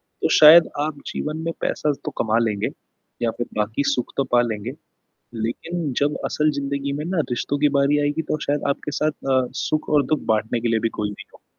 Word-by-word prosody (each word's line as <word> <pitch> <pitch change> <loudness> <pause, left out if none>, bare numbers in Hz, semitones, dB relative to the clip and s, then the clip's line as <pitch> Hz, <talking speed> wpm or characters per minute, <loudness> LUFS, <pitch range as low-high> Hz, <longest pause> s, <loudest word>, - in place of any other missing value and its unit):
तो - - -4
शायद 160 +2 +9 0.2
आप 155 -2 -5
जीवन 155 +1 -3
में 165 - -1
पैसा 150 - 0
तो - - -2
कमा 110 0 +2
लेंगे 105 -3 -1 0.5
या 115 - +2
फिर 120 - -2
बाकी 105 +6 0
सुख 125 - -3
तो 135 - +2
पा 120 - +6
लेंगे, 115 0 -3 0.6
लेकिन 140 +8 -3
जब 145 +1 +1
असल 155 0 +1
ज़िंदगी 140 0 -2
में 145 +2 -3
ना, 180 +2 -2
रिश्तों 125 +4 -1
की 150 +1 +4
बारी 140 +2 +3
आएगी, 145 +2 0
तो 155 - -2
शायद 145 0 0
आपके 140 +1 -2
साथ 155 - +3 0.2
अ, 130 -1 +3 0.2
सुख 155 -2 -1
और 150 -2 +4
दुख 155 0 0
बाँटने 110 +2 -1
के 120 - -1
लिए 115 -1 +2
भी 115 - +1
कोई 105 -1 -1
नहीं 105 - -10
होगा। - - -20
140 Hz, 210 wpm, -22 LUFS, 115-150 Hz, 0.6 s, शायद